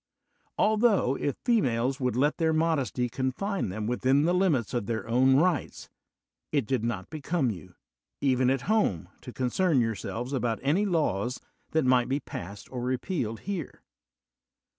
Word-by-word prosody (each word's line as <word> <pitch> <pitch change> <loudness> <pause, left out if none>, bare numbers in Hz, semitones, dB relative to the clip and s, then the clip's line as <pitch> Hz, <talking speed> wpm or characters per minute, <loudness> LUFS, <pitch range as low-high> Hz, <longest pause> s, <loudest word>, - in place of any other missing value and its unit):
Altho 215 - +3
if 140 0 -2
females 135 - +1
would 125 -3 0
lei 145 +4 +3
their 160 -1 +1
modesty 155 -6 +1
confine 130 - -2
them 105 +3 -4
within 130 +4 +2
the 175 +3 +2
limits 170 - +1
oi 120 - +2
their 115 +1 -4
own 130 +3 +4
rights, 165 +1 0 0.6
it 145 -6 +1
did 125 -1 -1
not 115 -6 -3
become 155 -3 -1
you, 90 -2 -10 0.4
even 130 -2 +2
at 135 -1 +1
home, 115 - 0
to 125 - -8
concern 140 +5 +1
yourselves 115 +2 -2
about 120 -4 0
any 170 +10 +2
laws 125 - 0 0.3
that 160 -3 +1
might 125 -1 +3
be 135 +2 +1
passed 100 - -8
or 125 -2 -4
repealed 125 - -2
here." 190 -8 -5
130 Hz, 150 wpm, -28 LUFS, 120-160 Hz, 0.6 s, own